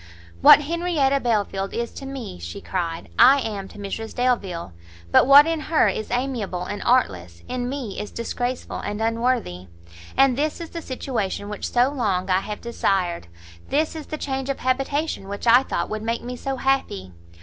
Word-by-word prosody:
"What - - +9
Henrietta 305 -3 +1
Belfield 205 -5 -1
is 235 0 -2
to 270 - -8
me," 260 - -7
she 85 0 -7
cried, 170 -3 -4
"I 265 +4 +8
am 205 -5 -4
to - - -14
Mrs 205 +2 -6
Delvile! 195 - -1 0.4
but - - +6
what 280 +2 +9
in 330 -1 -1
her 310 +1 +2
is 215 - -4
amiable 240 -8 -2
and 205 +3 -5
artless, 90 - +1
in 250 -1 -3
me 255 -7 -5
is 210 - -5
disgraceful 245 +2 -4
and 205 +1 -4
unworthy. 225 - -1 0.5
And 270 -2 +5
this 300 +3 -1
is 335 -1 -7
the 335 - -5
situation 225 -8 -3
which 210 - -4
so 245 +2 +4
long 195 -9 -1
I 185 - +4
have 210 +2 -6
desired! 190 - -1 0.4
This 310 +3 0
is 310 -2 -7
the 310 - -4
change 270 -2 -3
of 275 - -3
habitation 270 -2 -1
which 200 +3 -6
I 240 +2 +7
thought - - -2
would 215 0 -3
make 230 +2 -2
me 250 +1 -5
so 270 +2 -3
happy! 260 - -1
240 Hz, 180 wpm, -23 LUFS, 195-270 Hz, 0.5 s, What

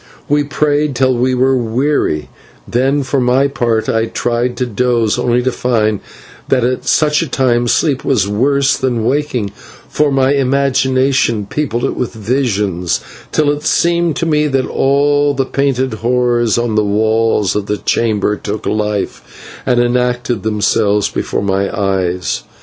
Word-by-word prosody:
We 145 0 +2
prayed 145 -1 0
till 130 +1 +2
we 130 +2 +1
were 130 +1 +2
weary, 120 - -1 0.4
then 135 +4 +1
for 140 +1 -1
my 125 +3 +3
part 120 -5 -1
I 115 0 +1
tried 120 +1 -2
to 125 - 0
doze, 120 -1 0
only 120 0 +1
to 130 - +1
find 110 -5 0 0.5
that 130 -3 +2
at 125 +1 -1
such 150 0 +2
a 165 - -2
time 120 -3 +1
sleep 140 +2 +1
was 105 -8 +1
worse 135 +6 +2
than 120 -4 -1
waking, 130 -6 -1 0.4
for 150 -1 +1
my 135 0 +2
imagination 130 -4 +1
peopled 120 0 -2
it - - -2
with 125 - -3
visions 105 -6 -1 0.3
till 150 -2 +2
it 145 0 -3
seemed 170 0 +1
to - - -1
me 150 -2 +2
that 135 -2 0
all 145 +1 +1
the 135 0 0
painted 130 -2 -1
horrors 120 0 +1
on 120 -1 -1
the 105 0 +2
walls 110 0 +1
of 105 -1 -2
the 105 - -1
chamber 105 -2 0
took 105 +1 -5
life, 105 -1 -4
and 125 -1 +3
enacted 120 -2 0
themselves 105 -1 +1
before - - -3
my 100 0 0
eyes. 95 -2 -1
125 Hz, 155 wpm, -15 LUFS, 110-135 Hz, 0.5 s, my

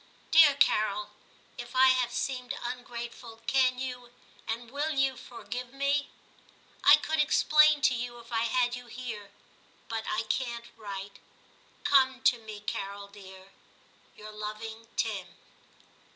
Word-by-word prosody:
Dear 310 -3 +8
Carol, 210 -5 +2 0.5
if - - -8
I 260 +1 +7
have 255 -2 +2
seemed 255 +1 -3
ungrateful, 240 -1 -7
can 255 -1 +3
you 250 -1 -5 0.4
and 230 +1 -4
will 290 +3 -1
you 270 -1 +2
forgive 245 0 -7
me? 280 +1 0 0.7
I - - +9
could 315 0 -2
explain 305 0 +5
to - - +5
you 240 0 -4
if 235 0 -14
I 230 0 +1
had 245 +1 +1
you 245 0 -10
here, 230 -4 -7 0.6
but 225 -1 -3
I 355 0 0
can't 235 -2 -2
write. 200 -2 -8 0.6
Come 265 -2 +3
to 240 - +4
me, 215 -2 -9
Carol 200 -1 -5
dear. 190 -1 -13 0.3
— - - -31
Your 215 0 -10
loving 215 +2 -7
Tim.' 205 -5 -2
240 Hz, 135 wpm, -29 LUFS, 220-260 Hz, 0.7 s, I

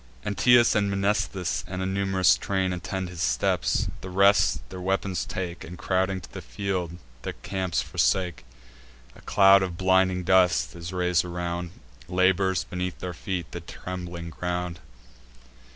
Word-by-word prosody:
Anteus 115 +4 +5
and 100 -2 +1
Mnestheus, 100 -3 -1
and 90 0 -5
a 95 - -1
num'rous 95 -2 +3
train, 95 -2 -1
Attend 90 +2 -4
his 90 -2 -7
steps; - - +1
the 95 - -7
rest 100 +2 +3
their 95 -1 -7
weapons 95 -1 -1
take, 90 -2 -5
And, 90 +2 -9
crowding 95 +1 0
to - - -14
the - - -6
field, 90 -4 -3 0.2
the - - -4
camp 95 -3 -4
forsake. 85 +7 0 0.7
A - - -15
cloud 100 -1 +6
of 90 -3 -3
blinding 95 0 +2
dust 90 -2 +3
is 85 +1 -7
rais'd 90 -2 +1
around, 85 0 -4 0.4
Labours 95 0 +2
beneath 90 0 -4
their 90 -1 -5
feet 85 0 -4
the 85 - -6
trembling 85 -1 -7
ground. 90 -1 -3
90 Hz, 145 wpm, -26 LUFS, 85-95 Hz, 0.7 s, cloud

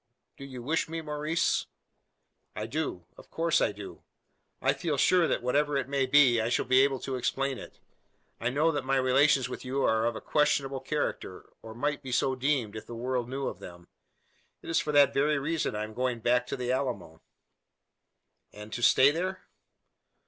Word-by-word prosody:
"Do 135 - -10
you 130 -3 -9
wish 160 +4 -1
me, 165 0 -4
Maurice?" 150 +1 -1 0.9
"I 105 - -4
do 115 - -4
of - - -16
course 165 0 +1
I - - +2
do. 100 -1 -10 0.6
I 135 - +2
feel 145 +1 -2
sure 175 +5 +4
that - - -1
whatever 145 +3 +1
it 135 - -2
may 140 -1 0
be, 130 -4 +5
I 110 - -1
shall - - 0
be 130 0 +5
able 135 -1 +2
to 130 -1 -3
explain 135 +1 -1
it. - - -12 0.6
I 115 - -1
know 150 +6 +2
that 145 -4 -2
my 135 +1 0
relations 135 +1 +3
with 125 - -7
you 135 +2 -2
are 110 +1 +2
of 120 - -2
a - - -5
questionable 140 -2 0
character; 135 -8 -4
or 110 0 -10
might 145 +4 -2
be 130 - -7
so 130 +2 +1
deemed, 130 -5 -1
if 110 0 -8
the 120 - -7
world 125 0 -2
knew 135 +1 -3
of - - -4
them. 85 -1 -12 0.7
It - - -6
is 165 - +3
for 150 - -2
that 145 -2 +5
very 150 +2 +2
reason 155 -2 -2
I 105 - -2
am 110 0 -7
going 125 0 -1
back 125 +2 +1
to - - -4
the 125 -1 -2
Alamo." 110 -12 -3 1.3
"And 105 +1 -11
to 120 - -4
stay 130 +3 +6
there?" 185 +4 -3
135 Hz, 195 wpm, -28 LUFS, 120-145 Hz, 1.3 s, stay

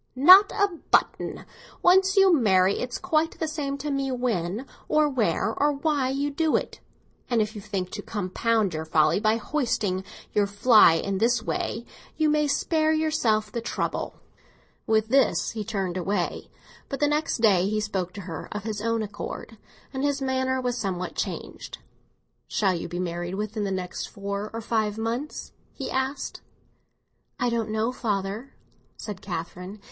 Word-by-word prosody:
"Not 370 +10 +8
a 405 -1 +2 0.2
button. - - +1 0.4
Once 380 +2 +5
you 385 -2 +7
marry, 195 -7 +3
it's 245 0 -3
quite 325 -3 0
the 320 - -2
same 290 -3 -3
to 290 +1 -4
me 275 -1 -1
when 230 -3 -1 0.2
or 305 0 +3
where 220 - 0
or 290 +4 +2
why 280 -2 0
you 280 +2 -1
do 315 +2 +1
it; - - -2 0.5
and 240 -2 +2
if 215 0 0
you 210 - -7
think 195 -3 -4
to 210 - -5
compound 210 +1 0
for 160 - -4
your 160 - -4
folly 155 +2 +3
by 215 +1 +3
hoisting 220 -8 -1 0.3
your 205 -1 +3
flag 205 -5 +5
in 195 -1 -1
this 230 +1 +2
way, 235 - -3 0.3
you 310 -1 +3
may 300 0 +2
spare 315 +2 +1
yourself 290 -9 +1
the 235 - -3
trouble." 235 - -3 0.7
With 220 0 +2
this 270 +2 +3
he 220 -1 -4
turned 195 -4 -2
away. 185 0 -2 0.4
But 275 - -4
the 295 - +3
next 300 +1 0
day 195 -6 +4
he 215 0 0
spoke 190 -4 -2
to 200 - -7
her 170 -4 -7
of 210 -1 -4
his 215 -1 -4
own 230 0 0
accord, 205 +1 -7 0.3
and 265 0 -2
his 285 -1 +1
manner 260 -1 0
was 250 -1 -2
somewhat 185 -3 -3
changed. - - -5 0.7
"Shall 195 -3 +1
you 170 - -4
be 175 - -5
married 175 0 -3
within 210 +1 -3
the - - -1
next 185 -2 -4
four 200 +1 -4
or 230 - -5
five 215 -2 0
months?" 235 +7 -4 0.2
he 270 - -5
asked. 265 +2 -2 1.0
"I 245 -1 +1
don't 230 -2 -1
know, 220 +2 0
father," 215 +1 -3 0.4
said 205 -3 -7
Catherine. 180 +2 -6
225 Hz, 170 wpm, -26 LUFS, 200-275 Hz, 1.0 s, Not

